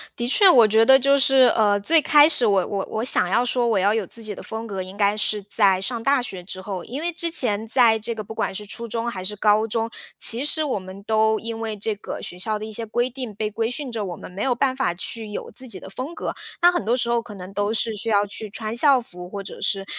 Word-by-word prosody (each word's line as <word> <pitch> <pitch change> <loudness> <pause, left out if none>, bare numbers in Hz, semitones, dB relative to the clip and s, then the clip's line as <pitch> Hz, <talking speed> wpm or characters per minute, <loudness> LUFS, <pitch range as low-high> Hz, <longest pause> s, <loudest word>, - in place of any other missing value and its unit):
的 240 - -3
确 380 - +5
我 235 -8 +7
觉 220 +1 +4
得 265 +2 +8
就 275 +1 +3
是， 270 -1 +5
呃， 205 -2 +3
最 320 +10 +4
开 295 0 +6
始 310 -6 +3
我 195 -4 +2
我 200 -1 -3
我 220 - -3
想 235 -7 +1
要 235 +6 +2
说 245 0 0
我 225 -3 +1
要 200 +2 +2
有 220 -4 -2
自 230 - -5
己 215 -1 -5
的 - - -10
风 220 +1 -6
格， 195 -4 -5
应 185 +2 -9
该 205 0 +2
是 210 -1 -2
在 200 -2 +3
上 230 +4 -4
大 275 +2 +2
学 185 -6 -6
之 185 +1 -8
后。 190 -2 -6
因 265 +5 -6
为 345 +1 -2
之 340 0 -3
前 225 -9 0
在 230 -2 +4
这 230 +2 -4
个 215 - -5
不 220 +2 -9
管 - - -2
是 210 - -6
初 230 +3 -5
中 230 +1 -3
还 185 -5 -6
是 210 +3 -3
高 210 +2 +2
中， 225 +1 -2 0.3
其 235 +3 +4
实 310 +1 -1
我 275 -8 -2
们 190 +1 -11
都 220 +1 +2
因 230 0 -6
为 220 -2 -4
这 215 +2 -1
个 205 - -7
学 180 - -6
校 215 +3 -1
的 215 - -6
一 220 - -8
些 230 +2 -3
规 240 +3 -1
定， 250 -4 -7
被 215 +1 -3
规 225 +2 -2
训 265 +1 -5
着 225 -3 -3
我 180 -2 -6
们 - - -11
没 190 +3 -7
有 255 0 +1
办 260 +1 0
法 260 -9 0
去 220 +4 -3
有 210 - -7
自 255 +4 -4
己 200 -6 -8
的 - - -11
风 260 - -6
格， - - -4 0.3
那 350 - +6
很 350 - -2
多 230 +4 +1
时 235 - 0
候 235 - +1
可 220 -3 -11
能 185 0 -10
都 205 +1 -1
是 225 0 +1
需 220 +2 -3
要 205 -1 +3
去 210 +1 -6
穿 215 +2 -4
校 275 +1 +5
服， 180 -6 -10
或 200 0 -6
者 - - -9
是， 195 -1 0
220 Hz, 305 characters per minute, -22 LUFS, 205-245 Hz, 0.3 s, 得